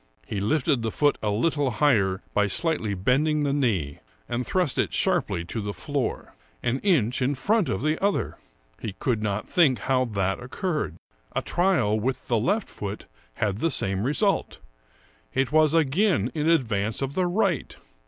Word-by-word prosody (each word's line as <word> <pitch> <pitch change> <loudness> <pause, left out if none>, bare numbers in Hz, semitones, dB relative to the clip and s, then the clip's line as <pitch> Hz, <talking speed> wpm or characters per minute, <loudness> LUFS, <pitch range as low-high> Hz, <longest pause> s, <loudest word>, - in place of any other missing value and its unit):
He 105 - -3
lifted 140 +3 +1
the 115 - -1
foot 145 +6 +1
a 105 - 0
little 145 +6 +1
higher 105 -7 +2
by 105 0 +2
slightly 110 - 0
bending 145 +10 +1
the 140 -1 +1
knee, 100 - 0 0.3
and 120 +1 -2
thrust 180 -7 0
it - - +1
sharply 85 - +1
to 110 +6 -4
the 105 0 -4
floor 140 -4 -3 0.2
— - - -36
an 125 +2 0
inch 130 - +2
in 135 +3 +1
front 200 - +1
of 95 - -2
the 155 +4 0
other! 200 0 0 0.4
He 110 - -5
could 115 0 -1
not 105 0 -2
think 150 -8 +4
how 130 +5 +1
that 95 -4 -1
occurred. 150 - -3 0.4
A - - 0
trial 175 - +2
with 125 +4 -2
the 120 -2 +2
left 200 - 0
foot 100 0 -6 0.3
had 105 -1 -1
the 165 - +1
same 95 -9 -1
result; 150 - +1 0.8
it 135 -1 +1
was 155 -1 +4
again 160 - +2
in 155 0 0
ad 165 -5 +4
vance 110 +2 -2
of 135 +1 -3
the 185 +2 +1
right. 180 - 0
130 Hz, 175 wpm, -25 LUFS, 105-155 Hz, 0.8 s, think